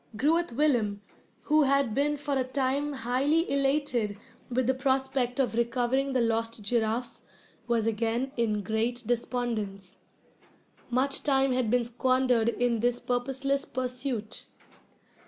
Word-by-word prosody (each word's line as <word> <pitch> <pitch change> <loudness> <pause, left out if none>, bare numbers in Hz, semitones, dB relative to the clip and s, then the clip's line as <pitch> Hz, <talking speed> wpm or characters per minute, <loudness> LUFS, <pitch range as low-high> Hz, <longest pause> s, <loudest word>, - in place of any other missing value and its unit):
Groot 325 +2 +2
Willem, 230 -8 +1 0.4
who 305 +1 +3
had 275 -4 +2
been 290 +4 +1
for 290 0 -3
a 265 - +2
time 270 +2 -1
highly 275 +6 +1
elated 270 -7 +1 0.3
with 255 0 0
the 260 - +3
prospect 265 -1 0
of 260 -3 +1
recovering 245 +3 0
the 255 - +2
lost 230 -1 -1
giraffes, 230 +2 -1 0.5
was 230 -2 +1
again 230 +4 -1
in 215 -3 0
great 225 +4 -1
despondence. 225 -5 -3 0.9
Much 260 +3 +1
time 270 -2 +2
had 250 -3 0
been 245 +1 +3
squandered 250 -1 +2
in 235 -1 0
this 245 +2 +1
purposeless 270 +3 -1
pursuit. 250 -4 -4
250 Hz, 125 wpm, -28 LUFS, 230-270 Hz, 0.9 s, who